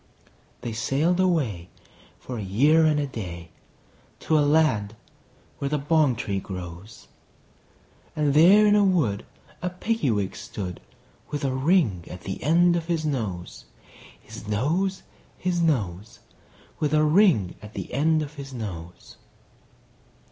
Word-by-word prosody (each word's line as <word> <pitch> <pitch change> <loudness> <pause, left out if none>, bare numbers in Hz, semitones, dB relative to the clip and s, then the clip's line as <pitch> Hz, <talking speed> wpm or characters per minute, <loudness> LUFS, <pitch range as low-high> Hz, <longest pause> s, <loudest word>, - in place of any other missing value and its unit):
They 120 -1 -4
sailed 140 +10 0
away, 135 - 0 0.5
for 125 -3 -7
a - - -4
year 145 +12 +4
and 150 -1 +2
a 145 - 0
day, 85 - -7 0.7
To - - -2
the 150 - +5
land 145 -9 +2 0.6
where 140 - -2
the 150 - 0
bong 150 -2 +2
tree 100 -4 -2
grows; 90 +2 -9 1.1
And 150 -2 +1
there 185 +8 +7
in 210 0 +5
a 205 - +5
wood 155 - +1 0.3
a 180 - -1
Piggy 185 - -1
wig 100 -4 -1
stood, 100 -4 -6 0.5
With 145 -1 -3
a 130 - 0
ring 130 - +2
at 90 - -9
the 95 - -6
end 170 +4 +4
of 165 -1 -3
his 165 -3 -1
nose, 105 - -4 0.5
His 105 - -11
nose, 165 - 0 0.3
His 180 -2 -1
nose, 105 - -1 0.6
With 150 0 +1
a 155 - +4
ring 155 - +4
at 105 0 -12
the - - -6
end 155 +3 +2
of 145 0 -8
his 135 -3 -9
nose. 90 -7 -8
140 Hz, 140 wpm, -25 LUFS, 105-160 Hz, 1.1 s, there